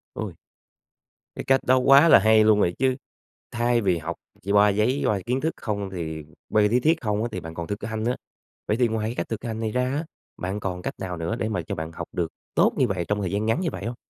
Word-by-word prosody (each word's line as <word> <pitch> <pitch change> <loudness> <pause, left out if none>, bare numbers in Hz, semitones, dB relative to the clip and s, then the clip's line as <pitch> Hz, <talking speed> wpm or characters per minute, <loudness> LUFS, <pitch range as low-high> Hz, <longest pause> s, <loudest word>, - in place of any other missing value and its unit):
Ôi! - - -5 1.0
Cái - - -4
cách 135 0 +3
đó 130 +1 +4
quá 135 +5 +6
là - - +9
hay 110 +2 +5
luôn 105 -1 +5
rồi 90 -3 +2
chứ! 130 0 +2 0.6
Thay 120 0 +1
vì 95 -4 +2
học 85 +1 -5 0.3
chi 100 - -3
qua 105 0 +6
giấy 110 +7 +1
qua 105 - +1
kiến 130 +2 -1
thức 160 +1 0
không 100 -2 -3
thì 80 -4 -5 0.3
qua 105 - +3
lý 110 +4 +3
thuyết 160 +5 +2
không 105 -3 -1
á 120 - -2
thì 95 - -4
bạn 80 -1 -8
còn 85 0 -5
thực 100 0 -5
hanh 110 -1 -3
nữa. 120 +2 0 0.5
Vậy 105 - +1
thì 125 - +3
ngoài 110 -1 -2
cái 120 - -5
cách - - -3
thực 110 - -4
hành 110 -2 -4
này 110 -1 -2
ra 125 +3 +1
á, 150 +4 -2 0.3
bạn 95 +3 -3
còn 90 -3 -4
cách - - -4
nào 90 -2 -4
nữa 85 +7 -2
để 110 -2 -2
mà 90 -5 -1
cho - - -3
bạn 80 0 -5
học - - -7
được 85 -2 -1 0.3
tốt - - +4
như 130 - +3
vậy 95 -5 -2
trong 105 0 0
thời 95 - -2
gian 100 +2 -1
ngắn 115 +8 +1
như 170 - 0
vậy 100 - -6
hông? 120 +2 -3
110 Hz, 270 wpm, -24 LUFS, 95-120 Hz, 1.0 s, là